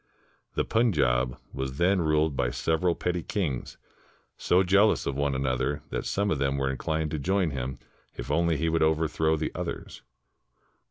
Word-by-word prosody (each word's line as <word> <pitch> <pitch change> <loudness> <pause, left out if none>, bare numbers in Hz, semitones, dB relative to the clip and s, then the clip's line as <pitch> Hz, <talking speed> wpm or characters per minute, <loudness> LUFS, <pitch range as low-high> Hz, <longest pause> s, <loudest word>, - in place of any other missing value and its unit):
The - - +1
Punjab 65 - +2 0.2
was 65 0 -4
then 90 +2 +3
ruled 75 -2 +2
by 60 -2 +1
several 80 +6 0
petty 90 -1 -1
kings 80 - -3 0.6
so 90 +2 +3
jealous 100 +4 +3
of 70 - -2
one 70 -1 0
another 65 +2 -1
that - - -3
some 100 +1 0
of 75 - 0
them 70 0 0
were 70 -1 0
inclined 80 +3 -2
to 75 - -2
join 95 +1 +1
him 65 -1 -4 0.4
if - - -5
only 85 +1 +2
he 80 +3 0
would 80 0 +1
overthrow 80 0 +2
the 80 - -2
others. - - -6
80 Hz, 165 wpm, -27 LUFS, 70-85 Hz, 0.6 s, then